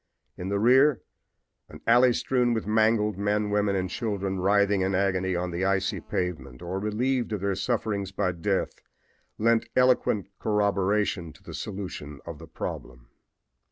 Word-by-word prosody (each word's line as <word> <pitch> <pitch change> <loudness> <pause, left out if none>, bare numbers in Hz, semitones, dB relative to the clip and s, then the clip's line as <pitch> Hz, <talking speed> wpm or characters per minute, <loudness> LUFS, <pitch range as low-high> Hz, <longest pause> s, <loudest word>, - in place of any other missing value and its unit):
In 90 +1 -5
the 100 - 0
rear 130 +5 +5 0.7
an - - -11
alley 125 +2 +6
strewn 125 -1 +1
with 110 - -2
mangled 110 -1 +2
men, 105 0 0
women 105 -1 +1
and 95 -1 0
children 100 -1 -3
writhing 100 +1 +3
in 95 0 0
agony 95 -1 +1
on 90 +1 -2
the 85 +2 -2
icy 95 +1 0
pavement, 70 -10 -4
or 90 +2 -3
relieved 120 +4 -1
of 105 - -3
their 100 0 0
sufferings 100 -2 -2
by 95 -1 0
death, 95 +3 -1 0.6
lent 115 +1 +2
eloquent 125 -6 +2
corroboration 100 -4 0
to - - -21
the - - -9
solution 90 -8 -6
of 85 -3 -8
the 80 - -11
problem. - - -7
100 Hz, 155 wpm, -27 LUFS, 95-110 Hz, 0.7 s, alley